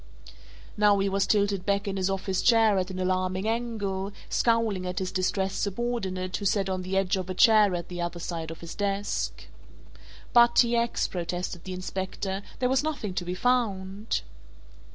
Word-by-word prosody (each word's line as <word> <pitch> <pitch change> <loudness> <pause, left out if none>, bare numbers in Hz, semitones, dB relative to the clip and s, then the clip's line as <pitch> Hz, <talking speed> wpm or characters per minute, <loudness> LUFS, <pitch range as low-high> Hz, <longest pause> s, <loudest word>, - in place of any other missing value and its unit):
Now 205 -1 +5
he 195 0 +1
was 195 0 +1
tilted 200 -3 +2
back 200 +1 0
in 195 - -2
his 190 0 0
office 195 -1 -1
chair 225 -4 +5
at 185 0 -2
an 185 - -6
alarming 185 +1 0
angle, 210 -4 -2 0.2
scowling 225 -6 +1
at 180 - -4
his 190 -2 -2
distressed 190 +1 -1
subordinate 195 -4 -2
who 205 - -6
sat 195 -1 +1
on 185 -1 -2
the 185 +1 -2
edge 195 +1 +1
of 185 -1 -4
a 185 - -3
chair 210 -2 +6
at 170 -1 -4
the 175 -1 -5
other 175 0 -3
side 165 -2 -4
of 165 - -9
his 170 -1 -7
desk. 200 0 -2 0.9
"But, 235 0 +6
T. 240 -1 +5
X.," 235 0 +1
protested 175 -1 -4
the 185 - -5
Inspector, 190 +1 -4 0.2
"there 250 - +1
was 265 0 +2
nothing 275 -11 -3
to 180 - -2
be 180 +1 -4
found." 205 - 0
195 Hz, 180 wpm, -27 LUFS, 185-215 Hz, 0.9 s, chair